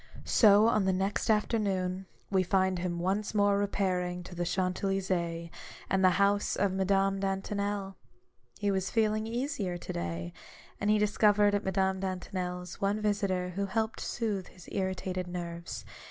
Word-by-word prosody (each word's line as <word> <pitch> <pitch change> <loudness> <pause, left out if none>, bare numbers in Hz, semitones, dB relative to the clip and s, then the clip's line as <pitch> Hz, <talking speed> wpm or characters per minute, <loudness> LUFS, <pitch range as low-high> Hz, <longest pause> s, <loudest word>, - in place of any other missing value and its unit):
So 210 -1 +6
on 215 -3 +3
the 190 - +2
next 195 +4 -1
afternoon, 195 -4 0 0.2
we 190 -1 +4
find 185 0 +1
him 175 -1 -2
once 195 +5 -1
more 205 -1 +4
repairing 180 -3 -1
to 180 - -10
the 175 0 -2
Champs 185 +2 -1
Elysees 175 -4 -1 0.4
and 190 0 +2
the 185 - +7
house 200 +1 +2
of 200 -1 +1
Madame 195 0 +2
DantoneL 195 0 -2 0.6
He 205 -1 0
was 190 -1 -1
feeling 215 -1 +1
easier 235 -7 -2
to - - -6
day; 85 0 -4 0.5
and 205 - 0
he 215 - +5
discovered 210 0 +4
at 205 +1 +1
Madame 190 0 +1
Dantonel's, 180 -1 -4
one 200 +2 +1
visitor 200 -4 0
who 200 +2 -2
helped 220 +3 -1
to - - -5
soothe 205 -6 -2
his 180 -3 -15
irritated 185 -1 -2
nerves. 170 -1 -6
195 Hz, 155 wpm, -30 LUFS, 180-205 Hz, 0.6 s, the